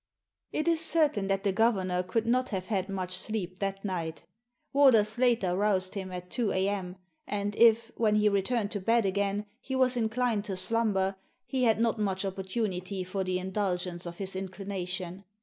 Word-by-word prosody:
It 305 - -1
is 330 -1 +4
certain 300 -12 +2
that 195 0 0
the 200 - +2
governor 190 -4 +2
could 200 +5 -1
not 255 +2 +1
have 190 -3 -3
had 195 -2 -1
much 185 -2 -2
sleep 185 -2 -3
that 195 0 -3
night 165 -4 -3 0.5
Warder 265 -6 +6
Slater 220 -4 +1
roused 190 -2 +1
him 190 -2 -5
at 180 0 -7
two 230 -5 0
a.m.; 190 -1 -1 0.3
and 205 0 -2
if, 230 0 +5
when 215 -2 +2
he 210 0 +4
returned 205 +2 +1
to 205 - -2
bed 230 +3 +2
again, 200 +1 0
he 265 - -5
was 260 -1 +3
inclined 230 -1 0
to 195 -3 -3
slumber, 195 -1 0 0.3
he 255 0 0
had 220 -1 +3
not 230 -1 +1
much 195 -2 0
oppor 195 0 -3
tunity 190 -2 -2
for 190 +1 -2
the 185 0 -1
indulgence 185 -2 -2
of 170 0 -7
his 195 -1 -5
inclination. 190 -1 -4
200 Hz, 180 wpm, -29 LUFS, 185-225 Hz, 0.5 s, Warder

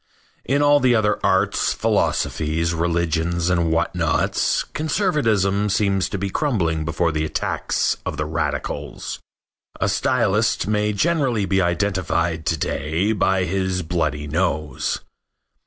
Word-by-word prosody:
In 140 +3 +2
all 145 0 +5
the 125 -3 +3
other 105 -2 +1
arts, 95 +2 +2
philosophies, 80 +2 0
religions 85 +1 0
and 85 -2 +1
what 85 +1 +1
nots 85 -3 +1
conservatism 115 - 0
seems 100 -2 +1
to 100 - -3
be 100 +1 -3
crumbling 90 - 0
before 80 +1 0
the 75 0 -1
attacks 80 0 -1
of 75 - -4
the 75 - -1
radicals. 75 0 -4 0.6
A - - +1
stylist - - +1
may 105 0 +1
generally 130 -3 +1
be 95 0 +1
identified 85 -3 0
to 80 - +1
day 80 +8 -1
by 95 -2 +1
his 95 0 -1
bloody 80 -3 -1
nose. 75 -3 -1
90 Hz, 125 wpm, -22 LUFS, 80-105 Hz, 0.6 s, all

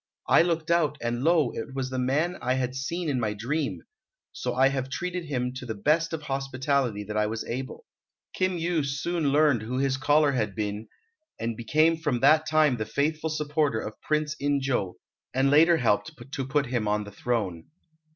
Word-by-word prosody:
I - - +6
looked 165 -1 0
out, 160 -3 +2
and 120 +1 -2
lo, 160 -5 +3
it 130 +4 -6
was 130 -1 -3
the 130 - -2
man 150 +8 0
I 130 +1 +1
had 125 -1 -1
seen 165 +6 -3
in 135 -4 0
my 105 -3 -1
dream! 135 +8 -2 0.5
so 125 -1 -4
I 130 +1 +5
have 135 -1 -3
treated 180 +3 -3
him 125 -4 -2
to 130 - -7
the 110 - -3
best 155 +9 +1
of 160 -2 -4
hospitality 135 -5 -1
that 105 +1 -6
I 105 0 +2
was 110 +1 -4
able." 130 - -5 0.5
Kim 185 -1 0
Yu 165 -2 0
soon 140 +2 -1
learned 145 -5 +4
who 120 +4 -4
his 135 0 +1
caller 145 +2 +3
had 110 -7 -1
been, 105 +1 -3 0.5
and 115 0 -2
became 155 +8 +2
from 150 -7 -1
that 155 +3 +5
time 155 -4 +3
the 110 - -2
faithful 155 +5 -1
supporter 150 -5 0
of 110 - -7
Prince 150 0 -1
In 145 0 +1
jo, 125 -9 -1 0.4
and 135 +1 +3
later 165 +3 +6
helped 125 +4 +1 0.2
to 135 -3 -3
put 145 +1 +1
him 120 -3 -1
on 105 0 +1
the 105 - -10
throne. 100 -6 -2
135 Hz, 195 wpm, -27 LUFS, 120-155 Hz, 0.5 s, I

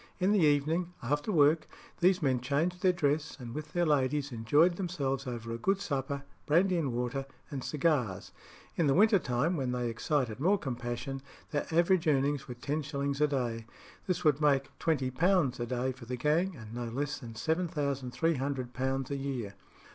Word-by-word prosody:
In 190 +2 +3
the 210 - +4
evening, 160 +3 +2
"after 145 - 0
work," 155 -2 +4 0.3
these 180 -1 +3
men 130 -3 +2
changed 160 +8 0
their 185 - +5
dress, 150 -3 0
and 120 -2 -7
with 155 +2 -6
their 175 0 +2
ladies 145 -1 +1
enjoyed 145 +10 +3
themselves 140 -8 -2
over 115 -2 -5
a 115 - -4
good 195 +8 +1
supper, 140 -4 -2 0.2
brandy 180 +5 +4
and 155 -6 0
water, 125 +3 -2 0.2
and 135 -3 -4
cigars. 145 - 0 0.4
In 165 - +2
the 135 - +3
winter 210 +2 +5
time, 140 +6 0
when 130 -3 -1
they 125 -1 -1
excited 125 -1 -1
more 190 +8 +3
compassion, 125 -2 -4 0.3
their 145 -2 -1
average 170 +1 +3
earnings 140 -1 +1
were 125 - -6
ten 145 +5 -2
shillings 140 -1 -2
a 150 - +5
day. 120 -5 -2 0.4
This 180 -1 -1
would 150 -2 +3
make 140 -2 +2
£20 145 0 +1
a 120 - -1
day 125 +1 -1
for 130 -1 -11
the 125 +1 -4
gang, 160 +8 +1
and 110 -4 -10
no 120 0 -3
less 145 +5 -3
than 115 -4 -9
£7300 135 -4 -1
a - - 0
year. 135 -7 -4
140 Hz, 175 wpm, -31 LUFS, 125-160 Hz, 0.4 s, their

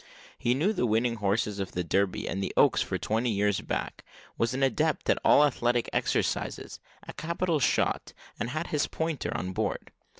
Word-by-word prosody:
He 120 +1 +1
knew 180 +11 +1
the 125 - 0
winning 115 +2 +1
horses 105 0 0
of 95 -2 -4
the 90 - -1
Derby 95 +3 0
and 95 +3 -2
the 95 - -2
Oaks - - +5
for - - -1
twenty 115 +3 0
years 105 -1 +1
back, - - -4 0.3
was 115 - 0
an 135 - 0
adept 155 +3 +1
at - - +1
all 150 - +6
athletic 120 -3 +1
exercises, - - -1 0.3
a - - -7
capital 170 0 -1
shot, 130 - +1 0.3
and 115 - -2
had 155 +5 -3
his 150 -2 0
pointer 160 -3 -3
on 90 - -4
board. - - -3
120 Hz, 180 wpm, -28 LUFS, 100-150 Hz, 0.3 s, all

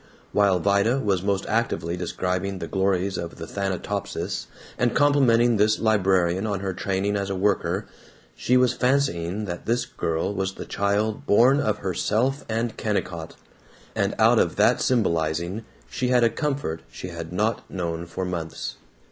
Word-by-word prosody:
While 100 -3 +3
Vida 100 +7 +2
was 100 -8 0
most 100 0 0
actively 110 -7 -1
describing 90 +2 -2
the 85 - -5
glories 95 +2 0
of 85 - -6
the 80 - -7
Thanatopsis, 95 +1 -3 0.3
and 120 - 0
complimenting 120 -5 +4
this 105 +1 +3
librarian 95 -3 +2
on 100 -3 -2
her 95 -1 -2
training 100 +2 -1
as 100 -1 -2
a 95 - -2
worker, 95 0 0 0.5
she 125 - +2
was 125 -1 +3
fancying 110 -8 0
that 90 -2 -6
this 120 +2 +1
girl 80 +4 -2
was 95 -1 -2
the - - -7
child 105 +2 -1
born 125 +7 +5
of 110 -6 0
herself 110 - 0
and 115 +1 -2
Kennicott; 90 -6 -3 0.6
and - - 0
out - - +5
of - - +1
that - - +3
symbolizing 85 -2 0 0.2
she 125 - -2
had 125 -1 +4
a 115 - +4
comfort 135 - -2
she 90 - -7
had 85 -1 -7
not 105 +5 -1
known 85 -2 -3
for 90 +2 -4
months. 85 -3 -4
100 Hz, 155 wpm, -24 LUFS, 90-115 Hz, 0.6 s, born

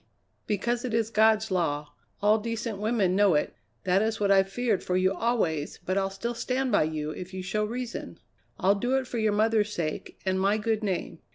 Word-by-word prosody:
"Because 235 +4 -1
it 245 -3 -2
is 225 -1 0
God's 220 0 +3
law. 150 -5 -1 0.3
All 210 +2 +5
decent 230 -1 -4
women 210 -4 +1
know 200 -4 +4
it. 150 - 0 0.3
That 185 +2 +3
is 220 0 -1
what 200 -1 +2
I've 195 0 +4
feared 235 0 0
for 180 - 0
you 185 +1 +2
always, 175 -11 -1
but 185 - 0
I'll 195 0 +1
still 215 +5 -4
stand 255 +2 -1
by 200 - +4
you 155 -1 -3
if 185 +3 -8
you 185 - -4
show 210 +3 -1
reason. 235 +2 -5 0.4
I'll 195 +2 +3
do 245 +6 0
it 265 - -1
for 240 -2 -4
your 220 -1 +2
mother's 215 0 +2
sake 160 -6 -4
and 190 0 +1
my 200 +2 +3
good 220 0 -1
name. 180 -4 -2
210 Hz, 205 wpm, -27 LUFS, 185-225 Hz, 0.4 s, All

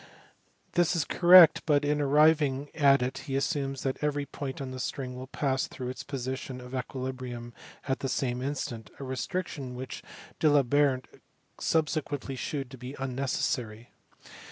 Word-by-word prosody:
This 175 0 +2
is 165 - +1
correct, 175 -2 +8
but 145 -2 +3
in 150 0 +1
arriving 145 -1 +3
at 140 -4 +4
it 125 - -3
he 135 - -1
assumes 135 -1 -1
that 135 -1 -2
every 145 -1 0
point 140 -2 -6
of 135 -2 -5
the 130 - -6
string 125 +2 -4
will 130 +1 -7
pass 135 -1 -1
through 125 -1 -6
its 130 - -6
position 130 -1 -5
of 125 0 -10
equili 130 0 -3
brium 120 -2 -7 0.4
at 135 0 0
the 135 - -2
same 125 -2 -1
instant, 125 -5 -4
a - - -6
restriction 135 0 -4
which 130 0 -6 0.4
D 155 - +3
Alembert 140 -2 +3 0.5
subsequently 150 -3 -1
shewed 135 0 -4
to 130 - -10
be 130 +3 -7
unnecessary. 125 -3 -2
135 Hz, 155 wpm, -29 LUFS, 130-145 Hz, 0.5 s, correct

